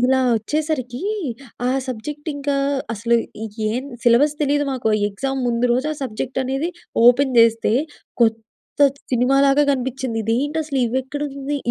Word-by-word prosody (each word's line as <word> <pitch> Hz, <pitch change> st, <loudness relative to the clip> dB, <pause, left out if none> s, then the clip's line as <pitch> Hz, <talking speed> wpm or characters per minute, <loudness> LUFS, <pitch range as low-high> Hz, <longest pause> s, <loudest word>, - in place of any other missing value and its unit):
ఇలా 260 Hz, +2 st, +3 dB, 0.2 s
వచ్చేసరికీ 255 Hz, +1 st, -2 dB, 0.6 s
ఆ -, -, +2 dB, 0.2 s
సబ్జెక్ట్ 290 Hz, +6 st, -6 dB
ఇంకా 285 Hz, 0 st, -1 dB, 0.4 s
అసలు 230 Hz, +2 st, +1 dB, 0.5 s
ఏం 250 Hz, +4 st, -2 dB, 0.2 s
సిలబస్ 260 Hz, +5 st, +4 dB
తెలీదు 290 Hz, 0 st, +2 dB
మాకు. 250 Hz, -4 st, -1 dB, 0.2 s
ఎగ్జామ్ 270 Hz, +6 st, -3 dB
ముందు 235 Hz, +1 st, +1 dB
రోజు 255 Hz, +5 st, 0 dB
ఆ -, -, -5 dB
సబ్జెక్ట్ 260 Hz, +1 st, -3 dB
అనేది 270 Hz, +6 st, -1 dB, 0.4 s
ఓపెన్ 260 Hz, +1 st, +5 dB
జేస్తే 230 Hz, -1 st, +4 dB, 0.5 s
కొత్త 225 Hz, -1 st, +2 dB, 0.7 s
సినిమా 250 Hz, +3 st, +3 dB
లాగా 275 Hz, +2 st, +4 dB
గనిపించింది, 260 Hz, -2 st, -3 dB
ఇదేంటి 270 Hz, +8 st, 0 dB
అసలు 280 Hz, -3 st, -1 dB
ఇవి 240 Hz, +3 st, 0 dB
ఎక్కడుంది! 280 Hz, +1 st, -4 dB
260 Hz, 135 wpm, -21 LUFS, 235-285 Hz, 0.7 s, ఓపెన్